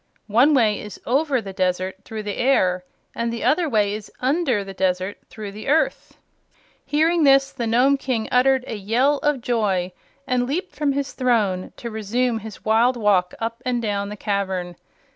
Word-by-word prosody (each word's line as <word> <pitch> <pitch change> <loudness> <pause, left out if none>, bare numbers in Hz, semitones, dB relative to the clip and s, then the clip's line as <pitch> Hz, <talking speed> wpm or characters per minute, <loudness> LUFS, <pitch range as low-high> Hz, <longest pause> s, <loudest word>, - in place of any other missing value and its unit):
"One 250 +8 +4
way 215 -5 +3
is 210 -2 -9
OVER 275 0 +1
the 195 -2 -8
desert, 185 0 -1
through 220 -1 -6
the 205 -1 -4
air; 185 -9 +2 0.3
and 235 0 -2
the 235 - -4
other 330 0 +2
way 210 -4 +2
is 215 0 -7
UNDER 260 -5 +1
the 195 0 -8
desert, 185 +1 -1
through 210 -2 -7
the 210 +2 -9
earth." 310 +4 0 0.7
Hearing 315 +4 +2
this 275 -1 +5
the 235 -3 -3
Nome 255 +5 +3
King 250 -5 -2
uttered 260 +1 +3
a - - -5
yell 240 +8 +1
of 295 -4 0
joy 205 -7 0 0.3
and 250 -1 0
leaped 350 +8 -3
from 290 -2 0
his 280 0 -3
throne, 215 -8 0
to 235 - -6
resume 225 +2 -1
his 220 -1 -10
wild 230 +3 +3
walk 195 -5 +2
up 230 +1 -4
and 250 -1 0
down 205 -3 -2
the 210 - -7
cavern. 190 -4 -2
230 Hz, 180 wpm, -22 LUFS, 200-265 Hz, 0.7 s, this